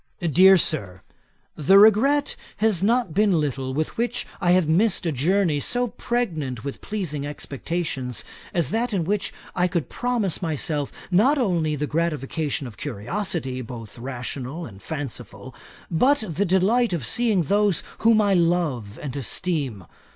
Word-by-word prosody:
'DEAR 185 +3 +6
SIR, 100 - -1 0.5
'The 175 +6 +5
regret 235 +8 +5 0.2
has 210 -4 +2
not 230 -3 +1
been 200 -2 +3
little 135 -3 -2
with 155 +4 -3
which 240 +1 -1 0.2
I 175 - +1
have 180 -3 +3
missed 185 +4 +2
a 165 - +1
journey 160 +3 +1
so 245 - +1
pregnant 160 - -3
with 140 -1 -6
pleasing 170 -9 -3
expectations, 140 -3 -3 0.3
as 170 -3 0
that 230 +2 -1
in 180 - 0
which 200 +4 -1 0.2
I 180 0 +2
could 170 -3 -2
promise 240 -8 -1
myself 150 -3 -2 0.2
not 240 +12 +4
only 170 - +1
the 150 +1 -2
gratification 150 -2 -2
of 120 -4 -9
curiosity, 135 - -3
both 115 -2 -9
rational 130 +5 -5
and 100 -7 -12
fanciful, 145 -6 -7 0.4
but 255 - +3
the 180 +4 -1
delight 195 +5 +2
of 155 -9 -2
seeing 220 - +2
those 200 +3 +2 0.2
whom 225 -1 +4
I 200 -1 +2
love 165 - 0
and 140 -3 -5
esteem. 140 - -2
170 Hz, 145 wpm, -24 LUFS, 140-205 Hz, 0.5 s, DEAR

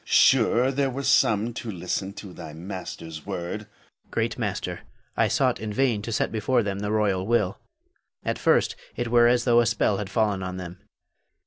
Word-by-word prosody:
Sure, 125 0 +4
there 135 0 +1
were 135 +2 -4
some 115 -2 +3
to 115 - -6
listen 95 +1 -3
to 100 -2 -10
thy 80 -3 -9
master's 80 -2 -7
word. 90 0 -4
Hafiz. 105 0 -22
Great - - -1
master, - - -3 0.4
I - - +3
sought - - +1
in 110 0 -4
vain 120 -2 +1
to 115 - -5
set - - 0
before 115 +3 +1
them 100 -1 -3
the 105 0 -2
royal 100 -3 +1
will. 105 -5 +1 0.7
At - - -1
first - - +3 0.2
it 120 -1 -2
were 120 0 +6
as 120 0 +3
though 120 -1 +5
a 120 - +3
spell 105 -2 +1
had 100 -1 -4
fallen 105 -2 +1
on 90 0 -4
them. 90 0 -8
105 Hz, 190 wpm, -25 LUFS, 95-120 Hz, 0.7 s, were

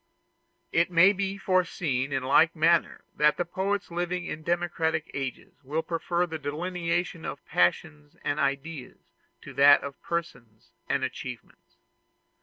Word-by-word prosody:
It 170 +2 +2
may 180 +3 +6
be 195 0 -2
foreseen 170 -8 0
in 135 -1 -1
the - - -5
like 160 +5 +5
manner 165 +2 +2
that 150 0 +4
poets 200 0 -1
living 175 +1 -2
in 155 - -5
democratic 165 -1 -1
ages 135 -2 -5
will 155 +5 -2
prefer 175 +1 -1
the 160 -2 -6
delineation 170 +3 -2
of - - -6
passions 145 - 0
and 145 +1 -1
ideas 140 0 -3 0.5
to - - -10
that 145 +1 +6
of 140 -1 -8
persons 125 -10 -5 0.2
and 140 - +1
achievements. 130 -1 -7
160 Hz, 135 wpm, -27 LUFS, 140-175 Hz, 0.5 s, may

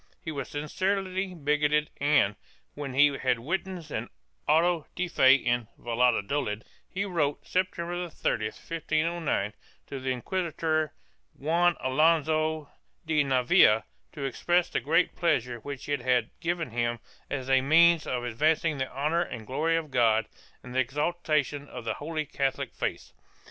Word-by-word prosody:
He 160 - -3
was 140 -4 -5
sincerely 185 +5 -2
bigoted 150 0 +1
and, 140 -9 +3 0.4
when 140 -3 -6
he 145 +1 +5
had 125 -2 +1
witnessed 170 +4 -4
an - - -3 0.4
auto 165 +1 +3
de 180 0 -1
fe 130 -5 +6
in 120 -3 0
Valladolid, 120 -1 0 0.3
he 200 +1 -2
wrote, 155 -7 -1
September 175 -1 -2
30, 110 -7 -1
1509, 160 -4 -1 0.3
to 135 - -6
the 130 0 -3
inquisitor 155 +2 -1 0.4
Juan 170 +5 +2
Alonso 155 +2 +2 0.3
de 155 -2 +2
Navia 125 -5 +4 0.3
to 145 - -6
express 175 +6 +1
the - - +1
great 165 +5 +2
pleasure 125 -8 0
which 140 +2 -7
it 145 -3 -1
had 125 0 +1
given 165 -5 -2
him 120 0 0 0.3
as 135 -2 -3
a 135 -1 +4
means 165 +3 +5
of 125 -1 -2
advancing 150 +5 +1
the 130 - -1
honor 150 +6 0
and 120 -10 -5
glory 160 +7 +1
of 155 -3 -4
God 115 -3 +3 0.4
and 125 - -9
the 130 - +1
exaltation 150 +1 0
of 115 - -8
the - - 0
Holy 155 +1 -4
Catholic 140 -2 -2
faith. - - -4
150 Hz, 145 wpm, -28 LUFS, 130-165 Hz, 0.4 s, fe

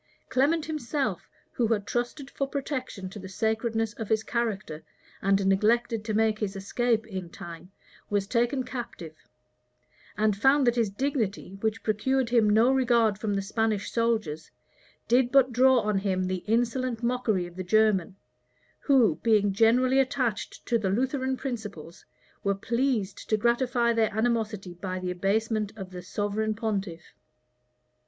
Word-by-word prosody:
Clement 300 +5 +2
himself, 280 - -3 0.2
who 235 - 0
had 215 -3 0
trusted 245 +5 -3
for 275 - -2
protection 265 -8 -4
to 205 - -8
the 190 0 -9
sacredness 220 +2 -1
of 220 -1 -6
his 220 0 +2
character, 210 -10 -2 0.4
and 195 0 +2
neglected 225 +3 +2
to 215 -1 -2
make 220 0 +2
his 205 -2 -3
escape 220 +3 0
in 190 -5 -6
time, 170 +2 -10 0.4
was 205 -1 0
taken 240 +5 0
captive; 235 -11 -7 1.0
and 210 0 +2
found 270 +6 +4
that 240 - +4
his 230 -4 +1
dignity, 210 -4 -2
which 220 0 -1
procured 235 +4 0
him 230 -3 +4
no 225 +5 +5
regard 235 -5 +2
from 210 -2 -1
the 195 - -1
Spanish 215 0 -1
soldiers, 220 -10 -1 0.6
did 245 +1 +3
but 265 -2 +4
draw 260 +1 +5
on 210 -2 0
him 190 -2 0
the 185 -1 -2
insolent 240 +1 0
mockery 235 -6 0
of 175 0 -11
the 185 - -4
German, 205 -1 +2 0.6
who, 265 -6 +3
being 210 -3 +3
generally 250 +5 +4
attached 255 -5 -1
to 235 -1 +1
the 195 -3 -1
Lutheran 260 +5 0
principles, 210 - -7 0.4
were 200 0 +1
pleased 235 -2 -1
to 215 - +3
gratify 235 +1 +2
their 225 -2 +2
animosity 220 -5 -1
by 185 +1 -5
the 185 -1 -3
abasement 210 +3 0
of 190 -2 -7
the 180 -1 -7
sovereign 205 +3 -2
pontiff. 200 -6 -4
220 Hz, 150 wpm, -27 LUFS, 195-245 Hz, 1.0 s, no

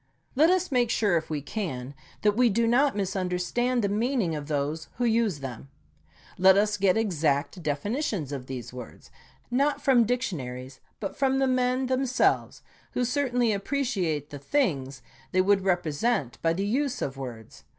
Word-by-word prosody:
Let 310 +5 +5
us 370 -2 +1
make 245 -3 +2
sure, 210 -6 +2
if 160 -1 -1
we 150 -3 -3
can, 140 - -4 0.3
that 210 -1 +3
we 245 +1 +4
do 230 +3 +2
not 260 +3 +3
misunderstand 195 +5 -1
the - - +2
mean 235 +7 0
ing 165 -3 -1
of 145 -1 -6
those 150 +1 -2
who 245 - 0
use 220 -9 +1
them. 135 0 -7 0.7
Let 190 +1 +7
us 210 +1 +2
get 195 -1 +2
exact 160 -5 0
definitions 165 - -2
of 130 -3 -5
these 125 -2 -6
words, 125 -2 -10 0.4
not 280 +4 +2
from 245 -4 +4
dictionaries, 135 - -3 0.2
but 195 - -4
from 270 -1 +1
the 270 - +3
men 255 0 +1
themselves, 255 0 +1 0.3
who 250 - 0
certainly 245 -3 +1
appreciate 200 - -1
the 145 - -7
things 140 - -1 0.3
they 185 - +4
would 195 +1 +3
represent 175 - 0
by 165 0 +2
the 195 +4 -2
use 265 +5 0
of 135 - -3
words. 120 -5 -9
200 Hz, 165 wpm, -27 LUFS, 145-245 Hz, 0.7 s, Let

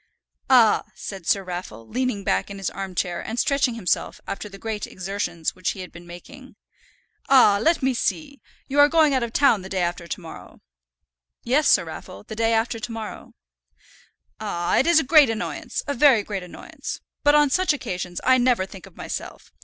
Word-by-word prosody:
"Ah," 240 -5 +5
said 190 -4 -8
Sir 195 - +2
Raffle, 175 - -7
leaning 250 -4 -2
back - - 0
in 200 - -7
his 195 - -3
arm 190 -1 -6
chair, 175 -1 -2
and 225 - -5
stretching 270 -3 +1
himself 200 -7 -1
after 210 +1 -5
the 195 - -11
great 215 0 -4
exertions 185 -3 -3
which 185 -1 -2
he 190 - -8
had 180 - -9
been 175 +1 -13
making 260 +10 -12 0.7
"Ah, 225 -7 +6
let 325 0 +2
me 265 0 +2
see! 280 +3 -3 0.3
You 280 +1 0
are 290 0 +7
going 315 -3 +4
out 260 - +2
of 235 -1 -3
town 235 -6 +3
the 190 - -9
day 190 -2 -1
after 175 0 -3
to - - -4
morrow." 165 -3 -12 0.8
"Yes, 270 +5 +2
Sir - - +5
Raffle, 165 +4 -9
the 220 - -8
day 225 +1 +1
after 230 +1 0
to 235 +2 -6
morrow." 225 -2 -8 1.0
"Ah! 175 0 -1
it's 335 +3 +5
a - - 0
great 290 -1 +6
annoyance, 225 -1 -4
a 285 - -2
very 260 -5 +5
great 200 -2 -4
annoyance. 180 -1 -8 0.2
But 290 0 +5
on 295 -2 +4
such 370 +2 +2
occasions 180 -10 -4
I 255 0 +4
never 245 -6 +2
think 190 0 -12
of - - -19
myself. - - -7
220 Hz, 190 wpm, -23 LUFS, 185-265 Hz, 1.0 s, are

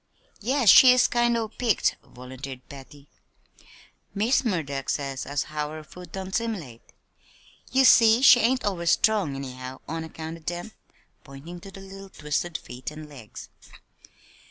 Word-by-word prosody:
"Yes, 250 +1 +2
she 255 +8 +9
is 255 - +4
kind 240 -1 +1
o' 225 -1 -2
peaked," 225 -1 0
volunteered 130 +1 -10
Patty. 140 +1 -13 1.1
"Miss 225 +8 +2
Murdock 150 - -3
says 135 -2 -3
as 140 0 -1
how 150 -1 -4
her 155 0 -8
food 180 +3 -13
don't 190 0 -7
'similate. 190 - -3 0.9
Ye 265 +2 +4
see 230 -1 +6
she 250 -2 +8
ain't 255 +2 +1
over 180 -4 -2
strong, 195 -4 +2
anyhow, 130 -1 -7
on 160 +1 -4
account 160 0 -8
o' - - -17
dem," 175 +6 -5 0.5
pointing 145 +6 -11
to 195 - -11
the 195 0 -12
little 195 0 -11
twisted 155 +1 -3
feet 125 +3 -8
and 155 0 -10
legs. 130 -8 -12
165 Hz, 150 wpm, -25 LUFS, 140-220 Hz, 1.1 s, she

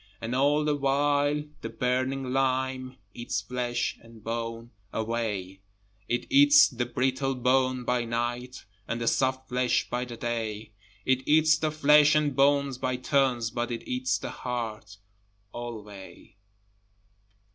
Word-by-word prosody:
And 115 +2 -4
all 145 +3 +2
the 150 -1 +1
while 145 +1 +1 0.2
the - - -5
burning 130 +1 -1
lime 130 -1 -1 0.2
Eats 120 -4 -3
flesh 120 +2 -2
and 115 -2 -16
bone 115 +1 -4 0.2
away, 105 -4 -3 0.5
It 120 - -1
eats 290 +1 +7
the 120 -2 -3
brittle 130 +2 0
bone 130 0 +1
by 125 -1 0
night, 120 +2 -3 0.2
And 115 - -2
the 115 - -3
soft 130 +1 +1
flesh 125 0 +1
by 125 +1 -1
the 120 -1 -9
day, 110 -2 -4 0.3
It 130 0 +2
eats 155 +1 +5
the 155 - 0
flesh 150 0 +5
and 150 -3 +1
bones 140 -1 +2
by 130 0 -1
turns, 125 -3 +1
But 120 +1 -2
it 120 -1 -5
eats 125 +1 0
the - - -6
heart 110 -4 -5 0.6
alway. 105 -6 -9
125 Hz, 135 wpm, -27 LUFS, 115-135 Hz, 0.6 s, eats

